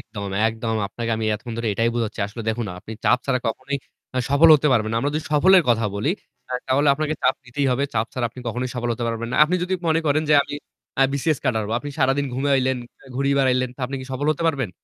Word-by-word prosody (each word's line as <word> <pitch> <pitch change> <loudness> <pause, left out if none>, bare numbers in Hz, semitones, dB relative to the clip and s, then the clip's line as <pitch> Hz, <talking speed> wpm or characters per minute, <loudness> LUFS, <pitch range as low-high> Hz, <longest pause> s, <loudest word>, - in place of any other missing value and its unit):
একদম, 100 -5 -7 0.2
একদম, 115 0 -3
আপনাকে 115 +3 -5
আমি 110 - -3
এতক্ষণ 115 +2 -7
ধরে 115 -1 -1
এটাই 115 +3 +1
বুঝাচ্ছি। 115 -3 -2
আসলে 115 +3 -8
দেখুন 110 0 -1
আপনি 105 - -9
চাপ - - +4
ছাড়া 130 -2 +2
কখনোই 130 +5 -2 0.4
আ - - +2
সফল 145 +4 +6
হতে 150 0 +2
পারবেন 110 -3 +1
না। - - 0
আমরা 140 +3 0
যদি 155 - -2
সফলের 185 +5 +6
কথা 115 -2 +3
বলি, 105 +10 0 0.4
আ - - -4
তাহলে 140 +3 +2
আপনাকে 155 +1 -1
চাপ 130 - +3
দিতেই 135 +3 -2
হবে। 130 +3 +1
চাপ 110 0 +1
ছাড়া 130 -2 -1
আপনি 120 +2 -11
কখনোই 125 +3 -2
সফল 120 -1 -2
হতে 120 +1 -3
পারবেন 115 0 -3
না। - - -1
আপনি 165 +4 -1
যদি 185 +1 -1
মনে 160 0 +3
করেন 150 +1 +2
যে 150 - +5
আমি 145 - -7 0.5
আ - - +7
BCS 140 +1 0
ক্যাডার 115 -5 +1
হবো। 110 +2 -2
আপনি 145 - -6
সারাদিন 135 +1 +2
ঘুমাইলেন, 130 -1 +1 0.4
ঘুরে 140 +1 +1
বেড়াইলেন 130 -1 +2
তো - - -12
আপনি 135 +2 -5
কি 130 - -8
সফল 135 +3 -2
হতে 155 - -6
পারবেন? 135 - -1
130 Hz, 240 wpm, -22 LUFS, 115-140 Hz, 0.5 s, আ